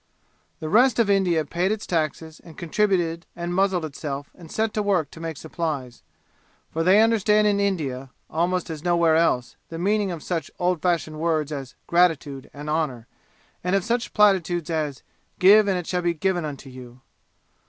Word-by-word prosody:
The 155 - -5
rest 235 +6 +4
of 225 -4 +3
India 180 -5 +2
paid 175 +6 -1
its 215 0 -3
taxes 160 -1 -2
and 165 - -14
contributed 175 -2 0
and 175 0 -4
muzzled 190 -2 +1
itself 145 -1 -6
and 165 -3 -14
set 220 0 -1
to 215 - 0
work 185 -8 0
to - - -12
make 165 -2 -5
supplies. 150 -6 -4 0.7
For 165 - -2
they 185 +5 +5
understand 215 -2 +3
in 205 -1 +2
India, 145 -10 -2 0.2
almost 175 +1 -1
as 155 -1 -7
nowhere 170 -2 +3
else, 160 -7 +1
the 165 - -6
meaning 205 +3 +1
of 165 -3 -6
such 170 -3 -3
old 180 -2 0
fashioned 160 -3 -1
words 155 -2 0
as 135 -3 -6
gratitude 160 -6 +1
and 145 +1 -9
honor; 150 -7 -1 0.6
and 180 +2 +1
of 195 - +1
such 240 +1 -1
platitudes 175 -5 +2
as, 150 -4 -2 0.3
"Give 205 +3 +6
and 190 -2 +1
it 175 - -4
shall 180 +1 -1
be 175 -1 0
given 175 +1 0
unto 140 -2 -7
you." 125 0 -12
170 Hz, 175 wpm, -24 LUFS, 155-190 Hz, 0.7 s, Give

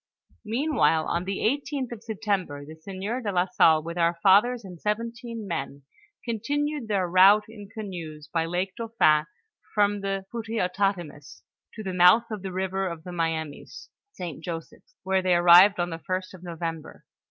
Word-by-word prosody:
Meanwhile, 230 - +1
on 175 +1 -2
the 195 0 -3
18th 275 +1 -1
of 230 -2 -8
September, 200 -10 -3
the 155 - -10
sieur 195 +9 -5
do 215 - -3
la 180 -2 +2
Salle 160 -4 +4
with 170 +2 -5
our 170 0 +2
fathers 215 +4 +4
and 180 -3 -11
seventeen 230 +1 -4
men, 140 -5 -5 0.4
continued 285 +4 -2
their 195 -4 0
route 190 +4 +6
in 210 -2 -11
canoes 170 -9 -7
by 165 +1 -1
Lake 180 +3 -2
Dauphin, 165 -10 +2 0.5
from 205 -1 +2
the 195 -1 -3
Pouteotatamis 185 - -3 0.3
to 215 - -7
the 190 -2 -4
mouth 180 +7 +5
of 210 -3 -4
the 190 -1 -5
river 190 +1 -2
of 170 -2 -6
tlio 180 - -8
Mianiis 160 -3 -4 0.2
(St. 165 -3 -7
Joseph's), 165 -1 -8
whore 190 0 +2
they 185 -1 +2
arrived 175 +3 +7
on 175 0 -1
the 165 - -5
first 185 +2 -4
of 185 - -12
November. 165 -2 -6
190 Hz, 165 wpm, -26 LUFS, 170-215 Hz, 0.5 s, arrived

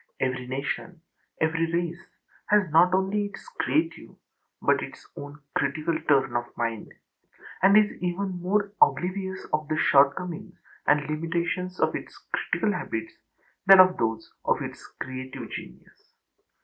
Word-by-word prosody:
Every 130 -1 -1
nation, 140 +6 -4 0.4
every 165 +1 +1
race, 170 0 -2 0.4
has 205 -6 +3
not 170 +3 +6
only 195 +2 +1
its 200 - -12
own - - -18
creative, 330 +2 -1 0.4
but - - +2
its - - -9
own 145 +1 -9 0.2
critical 160 +1 0
turn 140 -4 +3
of 120 0 0
mind; 115 -2 -3 0.7
and 195 +3 +7
is 210 -1 +2
even 180 0 -2
more 200 +2 0
oblivious 185 +1 +1
of 155 0 0
the 155 0 -1
shortcomings 145 +5 +2 0.3
and 145 -1 +3
limitations 170 +3 -2
of - - +2
its - - -7 0.2
critical - - 0
habits - - -4 0.5
than 195 -1 +10
of 185 0 +7
those 110 -1 -2
of - - +1
its - - -8 0.2
creative 130 -2 -6
genius. 60 - -11
170 Hz, 135 wpm, -26 LUFS, 140-185 Hz, 0.7 s, than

